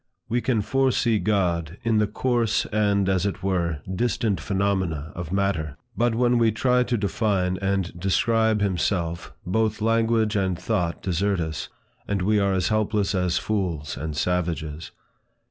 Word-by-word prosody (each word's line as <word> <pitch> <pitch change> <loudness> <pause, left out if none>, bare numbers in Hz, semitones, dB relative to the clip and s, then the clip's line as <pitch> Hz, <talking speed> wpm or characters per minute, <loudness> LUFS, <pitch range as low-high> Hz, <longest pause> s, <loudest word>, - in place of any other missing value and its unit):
We 120 +2 0
can 115 -5 +1
foresee 125 -1 +2
God 90 -5 0
in 115 -2 +2
the 105 - +2
coarse, 120 -2 0
and, 100 -2 +2
as 95 -2 +1
it 100 -2 -3
were, 85 -6 0
distant 105 -1 0
phenomena 95 -6 -1
of 85 -1 -6
matter; 95 -7 -1 0.2
but 120 +2 +1
when 120 0 +3
we 115 -1 +4
try 125 +3 +2
to 125 -1 0
define 100 -3 0
and 95 -2 -1
describe 110 +3 +2
himself, 85 -3 -1
both 110 +4 0
language 115 0 +2
and 95 -3 0
thought 90 -2 -2
desert 95 +1 0
us, 80 -2 -3 0.4
and 100 -2 -1
we 105 +2 +3
are 100 -1 +2
as 95 - +1
helpless 105 -2 +1
as 90 -2 +1
fools 90 -8 -2
and 75 0 -5
savages. 80 -3 -2
100 Hz, 150 wpm, -24 LUFS, 90-110 Hz, 0.4 s, we